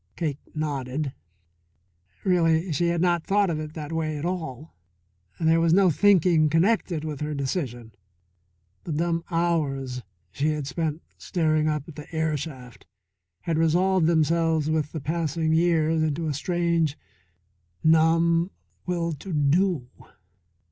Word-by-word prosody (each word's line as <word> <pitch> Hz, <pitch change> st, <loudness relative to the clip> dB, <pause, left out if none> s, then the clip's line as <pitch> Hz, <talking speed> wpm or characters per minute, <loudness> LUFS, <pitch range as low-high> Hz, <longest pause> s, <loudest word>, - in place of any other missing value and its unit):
Cake 150 Hz, -4 st, -2 dB, 0.2 s
nodded. 140 Hz, -2 st, -3 dB, 1.1 s
Really 170 Hz, -2 st, +2 dB
she 170 Hz, +4 st, +1 dB
had 170 Hz, -1 st, 0 dB
not 175 Hz, -2 st, +2 dB
thought 200 Hz, -2 st, +2 dB
of 155 Hz, -, -2 dB
it 155 Hz, 0 st, -7 dB
that 150 Hz, -1 st, -6 dB
way 155 Hz, -2 st, -2 dB
at 145 Hz, -, -4 dB
all. 160 Hz, -5 st, -4 dB, 0.7 s
There 165 Hz, 0 st, +3 dB
was 165 Hz, 0 st, +3 dB
no 190 Hz, -1 st, +5 dB
thinking 170 Hz, -2 st, +4 dB
connected 170 Hz, -1 st, +1 dB
with 150 Hz, -2 st, -5 dB
her 150 Hz, 0 st, -2 dB
decision. 130 Hz, -5 st, -3 dB, 0.9 s
The 165 Hz, -, -3 dB
dumb 165 Hz, +2 st, 0 dB
hours 145 Hz, -7 st, -1 dB, 0.3 s
she 140 Hz, +10 st, -1 dB
had 150 Hz, -2 st, -2 dB
spent 155 Hz, +3 st, -3 dB, 0.2 s
staring 155 Hz, -3 st, +1 dB
up 150 Hz, -2 st, -1 dB
the 150 Hz, -2 st, -10 dB
air 160 Hz, -1 st, 0 dB
shaft 130 Hz, -5 st, -8 dB, 0.5 s
had 165 Hz, -2 st, -1 dB
resolved 175 Hz, +2 st, +3 dB
themselves 160 Hz, -1 st, +2 dB
with 155 Hz, -2 st, -1 dB
the 160 Hz, -, -5 dB
passing 160 Hz, +1 st, -1 dB
years 160 Hz, -1 st, +2 dB
into 155 Hz, +1 st, -1 dB
a 155 Hz, -, -1 dB
strange, 170 Hz, -1 st, 0 dB, 0.9 s
numb 165 Hz, +2 st, +4 dB, 0.4 s
will 170 Hz, -2 st, -1 dB
to 170 Hz, +6 st, -8 dB
do. 155 Hz, -1 st, +2 dB
160 Hz, 135 wpm, -25 LUFS, 150-170 Hz, 1.1 s, no